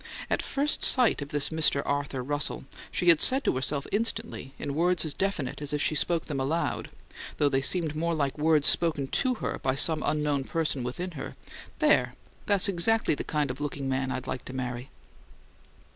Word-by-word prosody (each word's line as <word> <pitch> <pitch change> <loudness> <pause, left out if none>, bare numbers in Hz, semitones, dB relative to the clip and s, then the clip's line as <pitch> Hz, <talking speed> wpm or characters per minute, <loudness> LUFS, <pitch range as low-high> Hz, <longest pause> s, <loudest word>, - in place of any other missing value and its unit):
At - - +1
first 285 +2 0
sight 250 - +5
of 145 - -6
this 145 -1 +1
Mr. 155 -3 +2
Arthur 140 -2 -2
Russell, 145 +2 -3 0.3
she 175 - +2
had 165 -2 +7
said 265 +2 +4
to - - +1
herself 140 +2 -2
instantly, 225 -9 -1
in 140 - -4
words 170 +2 +1
as 155 - -2
definite 190 -10 -2
as 145 0 -3
if 150 - 0
she 150 - +1
spoke 165 +2 0
them 140 -3 -4
aloud, 150 +6 -2 0.5
though 145 - +3
they 135 -1 +1
seemed 160 +1 0
more 170 +2 -1
like 140 -3 -1
words 155 -1 +2
spoken 155 -5 +2
to 255 - 0
her - - -4
by 130 0 0
some 155 +3 +4
unknown 150 -2 0
person 155 -4 -1
within 175 +10 -4
her: 145 -5 -7 0.4
"There! 125 0 +2 0.3
That's 200 0 +3
exactly 200 +3 +2
the - - -4
kind 150 -3 -1
of 130 +3 -9
looking 145 -2 -3
man 130 0 -1
I'd 130 - -4
like 130 - -5
to 130 - -8
marry!" 125 -1 -5
150 Hz, 190 wpm, -27 LUFS, 135-170 Hz, 0.5 s, had